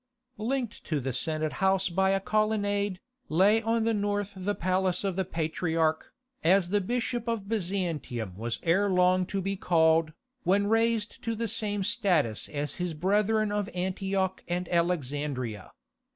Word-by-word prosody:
Linked 245 +1 -2
to 155 -3 -1
the 130 -1 -3
Senate 155 +4 -1
House 190 0 +3
by 190 +2 +2
a 195 0 +2
colonnade, 205 -2 0 0.3
lay 200 +7 +4
on 225 0 +1
the 225 0 +2
north 205 -1 -1
the 195 +2 -2
Palace 185 0 0
of 195 -3 -1
the 190 - +1
Patriarch, 160 -1 -1 0.3
as 180 +1 +4
the 205 0 +2
Bishop 240 +3 -2
of 225 -4 -2
Byzantium 170 - -2
was 115 +3 -3
ere 195 +5 +3
long 180 0 +3
to 195 0 -2
be 195 +1 -2
called, 160 -3 +3 0.3
when 195 +3 +2
raised 225 0 +1
to 230 0 -1
the 230 +1 -2
same 205 -2 -1
status 175 - +1
as 145 -1 -4
his 175 -3 -2
brethren 210 +5 +2
of 205 -1 -1
Antioch 190 +1 -1
and 175 0 -2
Alexandria. 145 - -1
190 Hz, 150 wpm, -28 LUFS, 165-205 Hz, 0.3 s, lay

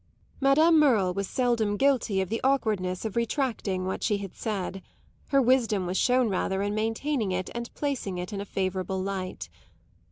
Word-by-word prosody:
Madame 310 +4 +5
Merle 220 -11 +3
was 195 +1 -2
seldom 230 -4 +1
guilty 250 -8 +2
of 190 - -3
the 225 +1 -2
awkwardness 215 -9 0
of 220 - -4
retracting 230 -6 -1
what 190 - -3
she 210 - +1
had 200 -2 -7
said; 195 -3 -4 0.5
her 275 - +3
wisdom 235 -7 +2
was 180 +1 -3
shown 250 +3 +3
rather 190 0 -1
in 205 0 -1
maintaining 225 +1 -1
it 185 0 -2
and 235 0 -5
placing 265 -10 -2
it 180 +4 -5
in 200 - -3
a - - -5
favourable 190 -1 -2
light. 190 -1 -4
210 Hz, 170 wpm, -27 LUFS, 190-250 Hz, 0.5 s, Madame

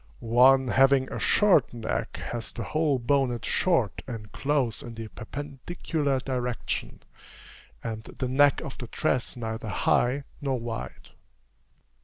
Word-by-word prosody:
One 130 +3 +5
having 135 0 +4
a - - -3
short 185 - +4
neck 115 -2 -3
has 115 -4 -5
the 115 - -5
whole 155 +3 +1
bonnet 125 -1 +1
short 130 - +1
and 110 -4 -7
close 135 -6 0
in 120 -1 -8
the 115 -1 -7
perpendicular 145 +3 -3
direction, 125 -2 -3 0.8
and 110 -1 -4
the 130 - -4
neck 140 +2 +4
of 135 - -7
the 120 - -6
dress 130 -1 -1
neither 110 -1 -4
high 125 +6 +2 0.2
nor 135 -3 -1
wide. 115 - -6
125 Hz, 130 wpm, -27 LUFS, 115-140 Hz, 0.8 s, One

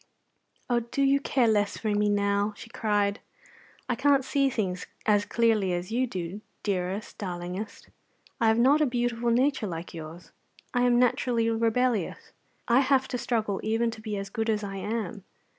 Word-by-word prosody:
"Oh, 240 -1 +2
do 235 +4 -2
you 275 +1 +4
care 260 -3 +2
less 205 -2 +1
for 220 - -2
me 205 0 +2
now?" 205 0 +1
she 230 - -11
cried. 205 -2 0 0.7
"I - - +1
can't 275 +1 +3
see 275 0 +2
things 185 -7 -2 0.2
as 205 -1 +3
clearly 220 -5 +2
as 175 +3 -3
you 255 +3 +1
do, 185 0 -5 0.2
dearest, 195 +1 -3
darlingest. 180 +2 -5 0.5
I 230 - +3
have 220 0 +4
not 275 +6 +5
a 300 - +4
beautiful 240 -1 0
nature 250 -1 +2
like 170 -1 -6
yours. 165 +1 -9 0.4
I 245 0 +3
am 240 -1 +4
naturally 240 -1 +2
rebellious. 230 -2 0 0.4
I 240 +2 +5
have 270 -1 +3
to 250 - -2
struggle 220 -5 -1
even 225 +2 0
to 225 - -10
be 215 -2 -4
as 195 0 -5
good 225 +1 -1
as 215 -1 0
I 195 -1 -5
am. 210 -1 -3
220 Hz, 175 wpm, -27 LUFS, 200-245 Hz, 0.7 s, not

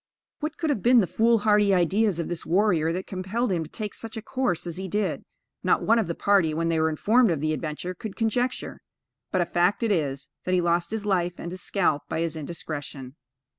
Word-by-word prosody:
What 305 +1 -4
could 320 -3 0
have 225 - -1
been 245 +3 +6
the 205 - +3
foolhardy 210 -1 +3
ideas 190 +2 +2
of 170 - -2
this 175 -2 -4
warrior 175 -4 +2
that 185 +3 -3
compelled 195 +5 -2
him 170 -3 0
to 155 - -10
take 210 +1 -5
such 225 0 -7
a - - -4
course 245 -11 -1
as 170 -1 -5
he 190 0 -4
did, 205 +2 -1 0.4
not - - +2
one 230 +1 +4
of 215 - 0
the 170 - -3
party, 190 -6 +2
when 165 +1 0
they 165 -1 +1
were 160 0 +3
informed 220 +9 +3
of 165 -4 0
the 155 +1 0
adventure, 155 +3 -4
could 195 +3 -7
conjecture; 245 +3 -1 0.5
but, 185 - +2
a - - +2
fact 175 +6 +1
it 225 - +1
is, 140 -6 -1
that 185 - +1
he - - +3
lost 170 0 +1
his 220 -1 -4
life 180 -3 +1
and 170 - -6
his 185 0 -6
scalp 170 -7 +1
by 160 - -1
his 165 -1 -1
indiscretion. 145 -4 -6
185 Hz, 225 wpm, -26 LUFS, 165-215 Hz, 0.5 s, been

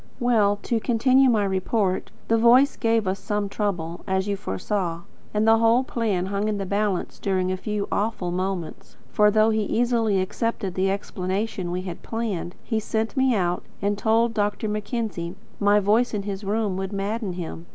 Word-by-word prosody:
Well, 220 -5 +3
to 235 - 0
continue 255 +3 +4
my 220 -4 +3
report. 190 0 0 0.2
The 225 0 +3
voice 250 +5 +5
gave 225 -2 +1
us 190 +1 -1
some 205 -2 -2
trouble, 175 -5 -3
as 190 +1 0
you 200 - 0
foresaw, 170 - -3 0.3
and 215 +1 +1
the 225 0 +6
whole 230 +3 +4
plan 215 -8 -1
hung 200 +2 -1
in 215 -1 -1
the 195 - -3
balance 200 -1 -1
during 185 -2 0
a - - 0
few 205 +2 -3
awful 205 -4 -1
moments; 185 -2 -4
for, 210 +7 +5
though 215 +1 +4
he 220 0 +1
easily 225 -2 +1
accepted 200 0 -2
the 190 +1 +1
explanation 195 0 -2
we 180 +1 -3
had 180 -2 -6
planned, 210 -6 -3
he 225 -3 -1
sent 220 +2 -2
me 265 -2 +3
out, 180 -3 0 0.2
and 205 +1 0
told 225 +2 +2
Dr. 210 0 -1
Mackenzie 210 -5 -3 0.2
my 205 0 +4
voice 215 +4 +2
in 200 - -2
his 200 0 -5
room 205 -1 -1
would 190 0 -3
madden 200 0 -2
him. 170 -1 -7
205 Hz, 180 wpm, -24 LUFS, 190-225 Hz, 0.3 s, the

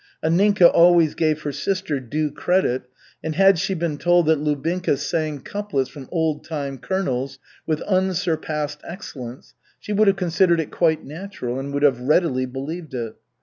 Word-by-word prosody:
Anninka 185 +3 +4
always 170 -2 +5
gave 155 -1 0
her 145 - -2
sister 160 0 -2
due 150 +4 -2
credit, 150 -6 0 0.4
and 160 0 -3
had 195 -1 +5
she 190 +2 -1
been 160 -4 -2
told 175 -1 +4
that 160 -1 +3
Lubinka 150 +2 0
sang 150 0 -2
couplets 200 -11 -3
from 140 -3 -10
Old 160 -3 0
time 140 -4 -5
Colonels 135 -8 -2 0.3
with 155 -2 0
unsurpassed 165 -6 -1
excellence, 135 - -9 0.3
she 210 - -5
would 210 +1 +3
have 195 0 +4
considered 175 -1 +2
it 160 - -3
quite 160 -2 +1
natural 150 -6 -5
and 140 +1 -5
would 140 +1 -1
have 135 -4 +4
readily 130 -2 +2
believed 140 +4 -6
it. 115 -3 -4
155 Hz, 160 wpm, -22 LUFS, 140-180 Hz, 0.4 s, always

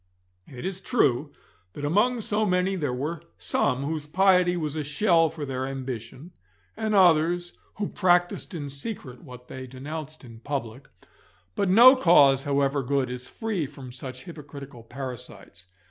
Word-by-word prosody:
It 125 +2 -9
is 190 0 -4
true 145 - +1 0.4
that 145 - -5
among 225 +10 +2
so 215 0 0
many 185 -1 +1
there 150 -7 -2
were 150 +7 -3 0.2
some 90 +9 0
whose 150 0 -3
piety 180 +1 +3
was 155 -3 -3
a 155 - -2
shell 165 +2 +3
for 150 -2 -6
their 130 -1 -3
ambition, 130 +3 -7 0.4
and 220 -1 -1
others 175 -1 +3 0.2
who 205 -1 -2
practised 175 -1 +1
in 145 -4 -5
secret 140 - -6
what 125 -4 -12
they 130 0 -8
denounced 150 +4 -7
in 115 -2 -12
public, 130 -1 -5 0.7
but 195 - 0
no 240 +7 +9
cause 145 - +5
however 140 0 +1
good 135 -1 -1
is 125 0 -6
free 210 - -3
from 135 -3 -11
such 130 0 -8
hypocritical 145 -5 -10
parasites. 120 -7 -9
145 Hz, 150 wpm, -26 LUFS, 130-180 Hz, 0.7 s, no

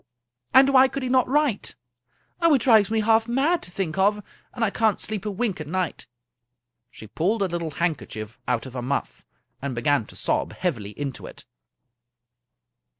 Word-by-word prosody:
And 265 +1 +7
why 265 -1 +6
could 275 0 -5
he 255 - -2
not 255 -1 +3
write? 285 -6 0 0.7
Oh! 335 -3 +5
it 260 - +1
drives 220 -5 +5
me 220 0 +1
half 225 +1 +3
mad 280 +9 +1
to - - -8
think 180 -1 -3
of, 205 +2 +2 0.3
and 235 -2 -1
I 205 - 0
can't 220 -2 +1
sleep 215 -1 -4
a - - 0
wink 200 -3 -2
at 155 - -7
night/* 180 0 -3 0.8
She 110 - -12
pulled 190 - 0
a - - +1
little 170 -2 -3
handkerchief 140 -10 -4
out 125 -1 0
of 130 - -9
her 125 - -4
muff, 135 +3 -4 0.3
and 135 -2 -4
began 120 -1 +1
to - - -13
sob - - -1
heavily 115 - -3
into 140 -4 -5
it. - - -12
195 Hz, 180 wpm, -24 LUFS, 145-235 Hz, 0.8 s, And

